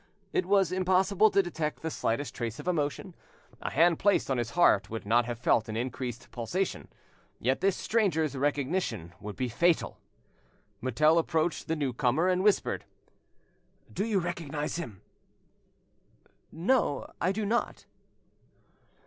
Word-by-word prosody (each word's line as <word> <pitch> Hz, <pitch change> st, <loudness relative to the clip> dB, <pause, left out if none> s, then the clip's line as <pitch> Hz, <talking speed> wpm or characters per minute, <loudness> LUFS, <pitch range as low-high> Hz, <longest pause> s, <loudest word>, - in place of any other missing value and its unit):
It 180 Hz, -, +1 dB
was 195 Hz, -3 st, +3 dB
impossible 185 Hz, +3 st, +3 dB
to 200 Hz, -1 st, +3 dB
detect 160 Hz, -4 st, -4 dB
the 160 Hz, -, -2 dB
slightest 125 Hz, +1 st, -2 dB
trace 120 Hz, -2 st, -4 dB
of -, -, -9 dB
emotion, 160 Hz, +1 st, -1 dB, 0.5 s
a -, -, -2 dB
hand 165 Hz, +2 st, +3 dB
placed 200 Hz, -8 st, +2 dB
on 130 Hz, -, +1 dB
his 120 Hz, -1 st, -2 dB
heart 105 Hz, -, +4 dB
would 115 Hz, -1 st, -5 dB
not 120 Hz, +3 st, +3 dB
have 120 Hz, -1 st, -4 dB
felt 115 Hz, -2 st, +2 dB
an 110 Hz, -, -3 dB
increased 120 Hz, -1 st, -4 dB
pulsation, 170 Hz, -, -3 dB, 0.5 s
yet 130 Hz, +5 st, 0 dB
this 195 Hz, -1 st, +2 dB
stranger's 165 Hz, -10 st, +1 dB
recognition 135 Hz, -, -1 dB
would 105 Hz, 0 st, -7 dB
be 130 Hz, -, -1 dB
fatal! 165 Hz, +8 st, +1 dB, 0.8 s
Mutel 155 Hz, +7 st, +3 dB
approached 165 Hz, 0 st, -1 dB
the 160 Hz, -, 0 dB
new 140 Hz, -5 st, -1 dB
comer 135 Hz, +7 st, +1 dB
and 185 Hz, 0 st, +1 dB
whispered— 210 Hz, -1 st, +1 dB, 1.1 s
"Do 200 Hz, -, -1 dB
you 215 Hz, -2 st, 0 dB
recognise 165 Hz, -4 st, -3 dB
him?" 115 Hz, -, -7 dB, 1.5 s
"No, 175 Hz, -, +1 dB, 0.2 s
I 180 Hz, -, +2 dB
do 210 Hz, +2 st, -2 dB
not." 235 Hz, +4 st, -1 dB
155 Hz, 140 wpm, -29 LUFS, 125-185 Hz, 1.5 s, heart